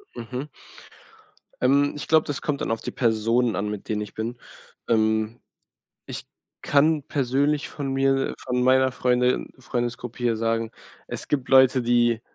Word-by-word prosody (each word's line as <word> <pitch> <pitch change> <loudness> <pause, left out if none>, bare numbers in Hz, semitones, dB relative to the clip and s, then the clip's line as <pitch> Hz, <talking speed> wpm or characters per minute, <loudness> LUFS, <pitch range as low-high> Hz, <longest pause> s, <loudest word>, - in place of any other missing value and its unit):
Mhm. 125 +4 -5 1.2
Ähm. 140 +3 +3
Ich 150 - -6
glaube, 160 0 +4
das 145 - -3
kommt 145 -2 -2
dann - - -1
auf 115 0 -2
die - - -5
Personen 115 0 +1
an, 105 +1 -2
mit 105 -2 -6
denen 105 -1 -1
ich 105 - -7
bin. 115 +2 -4 0.5
Ähm, 110 0 +1 0.7
ich - - -7 0.4
kann 150 +1 +3
persönlich 140 +1 0
von 140 -2 -4
mir, 135 0 +1
von 125 0 -1
meiner 130 +1 +4
Freunde 125 0 +1
Freundesgruppe 120 -1 -4
hier 120 -2 +1
sagen: 115 0 -1 0.4
Es - - -7
gibt 135 -4 -1
Leute, 130 -1 +6
die 120 -1 +2
125 Hz, 150 wpm, -24 LUFS, 115-135 Hz, 1.2 s, Leute